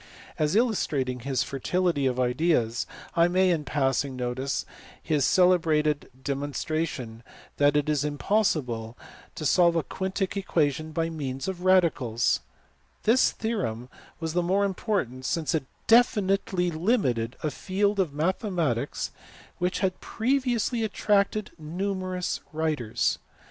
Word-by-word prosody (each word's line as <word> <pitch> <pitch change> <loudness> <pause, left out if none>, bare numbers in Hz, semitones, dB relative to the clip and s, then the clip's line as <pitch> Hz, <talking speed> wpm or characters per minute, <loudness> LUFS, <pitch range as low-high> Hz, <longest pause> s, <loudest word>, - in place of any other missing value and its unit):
As 155 +3 +1
illustrating 145 - +1
his 130 +1 -1
fertility 145 +1 0
of 130 -1 -1
ideas 125 -2 +1 0.3
I 170 0 +5
may 185 +1 +3
in 160 -3 0
passing 135 -1 0
notice 130 +2 -2 0.3
his 150 -4 +1
celebrated 160 -5 +3
demon 140 +1 -3
stration 140 -9 -3 0.4
that 145 0 +4
it 150 0 +1
is 150 -2 +1
impossible 145 - 0 0.4
to 155 - -5
solve 170 +3 +4
a 165 - +1
quiutic 190 +6 -3
equation 155 -5 0
by 165 +1 -1
means 135 -3 -4
of 185 -2 -4
radicals; 145 -11 +3 0.6
this 235 +4 +4
theorem 125 - -3 0.3
was 160 -1 -3
the 175 - +2
more 190 +3 +2
important 185 - -2
since 160 +4 -1
it 155 -4 0 0.2
definitely 195 -6 +3
limited 155 - 0
a 155 - 0
field 200 +6 0
of 180 -6 +1
mathematics 165 - -1 0.5
which 180 +1 -1
had 185 -2 -1
pre 260 +5 0
viously 240 -2 0
attracted 205 -1 +1
numerous 185 +3 -3
writers. 155 -8 0
160 Hz, 125 wpm, -27 LUFS, 135-190 Hz, 0.6 s, I